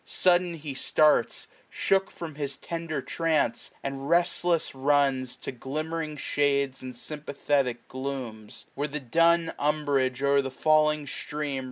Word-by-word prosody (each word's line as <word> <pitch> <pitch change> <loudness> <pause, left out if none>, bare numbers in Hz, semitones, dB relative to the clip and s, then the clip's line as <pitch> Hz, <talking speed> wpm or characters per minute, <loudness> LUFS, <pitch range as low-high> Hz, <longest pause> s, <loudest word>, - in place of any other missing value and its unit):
Sudden 180 -1 +2
he 150 -3 -6
starts. 150 -1 +2 0.2
Shook 195 0 +1
from 165 -3 -7
his 140 -2 -4
tender 165 -4 -4
trance, 160 -8 0
and 135 +1 -4
restless 170 -1 +2
runs 135 -2 +2
To - - -6
glimmering 155 +4 -4
shades, 140 -2 +1
and 130 -1 -7
sympathetic 140 -3 -1
glooms; 130 -5 -6
Where 145 +2 -2
the 150 +1 -4
dun 165 +5 +3
umbrage 140 -3 +1
o'er 140 0 +4
the 135 - -4
falling 150 +2 +3
stream. 145 -1 -4
145 Hz, 130 wpm, -27 LUFS, 135-155 Hz, 0.2 s, o'er